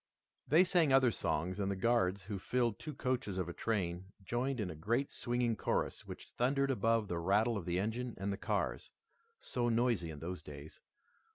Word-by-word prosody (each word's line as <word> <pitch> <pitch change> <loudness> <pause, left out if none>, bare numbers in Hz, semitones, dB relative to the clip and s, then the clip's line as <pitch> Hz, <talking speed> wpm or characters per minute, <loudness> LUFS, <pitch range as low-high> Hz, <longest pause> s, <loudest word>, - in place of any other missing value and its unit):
They 160 +7 +6
sang 175 -5 +3
other 130 -2 +5
songs 90 0 -1
and 100 -1 0
the 100 - -1
Guards, 100 -3 +1
who 100 0 -5
filled 120 +1 0
two 150 -3 -6
coaches 125 -7 -1
of 90 -2 -1
a 85 - -5
train, 90 -5 -1 0.2
joined 125 +6 -1
in 100 -4 -2
a - - -7
great 115 - 0
swinging 120 -1 0
chorus - - -1
which - - -9
thundered 135 +2 +1
above 115 -2 +2
the 85 -2 -2
rattle 105 +7 +2
of 100 -5 -4
the 90 0 0
engine 115 +4 -2
and 100 +1 -2
the - - -4
cars, - - -2 0.5
so 120 -1 -1
noisy 115 -7 +1
in 75 - -7
those 85 +2 -5
days. 75 -1 -10
110 Hz, 190 wpm, -35 LUFS, 90-125 Hz, 0.5 s, They